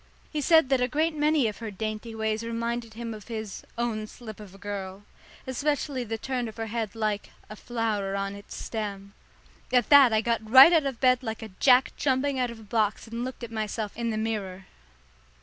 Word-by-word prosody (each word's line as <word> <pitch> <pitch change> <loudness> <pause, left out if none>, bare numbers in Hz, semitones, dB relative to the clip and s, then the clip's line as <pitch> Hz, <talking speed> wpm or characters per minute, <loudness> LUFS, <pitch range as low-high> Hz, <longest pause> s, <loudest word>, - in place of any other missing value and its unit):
He 305 - -2
said 320 -1 +5
that 265 -2 +3
a 250 - +3
great 310 +4 0
many 300 -4 +3
of 210 - -5
her 225 - -5
dainty 215 +2 -5
ways 220 0 -1
reminded 230 0 -3
him 230 0 -5
of 210 -2 -11
his 220 -4 -6
"own 225 -2 -2
slip 220 -2 -10
of 200 -3 -11
a - - -13
girl," 200 -1 -6 0.4
especially 280 0 -1
the 225 -1 -4
turn 250 +1 -3
of 220 - -10
her 225 - -3
head 220 -2 -3
like 215 -2 -2 0.2
a - - -6
"flower 215 -4 -2
on 195 0 -2
its 200 0 -10
stem." 200 -3 -5 0.6
At 250 -1 +3
that 280 -4 +8
I 220 0 +3
got 230 0 0
right 265 +8 +10
out 310 -4 +4
of 265 -4 -4
bed 255 -1 +4
like 225 -3 -5
a 220 - -7
jack 255 -1 +5
jumping 270 0 +1
out 250 -1 +1
of 235 -1 -9
a - - -12
box 215 -1 0
and 230 +1 -5
looked 255 -1 -6
at 235 - -6
myself 215 -1 -3
in 235 0 -2
the 220 - -2
mirror. 200 -4 -3
225 Hz, 210 wpm, -27 LUFS, 215-255 Hz, 0.6 s, right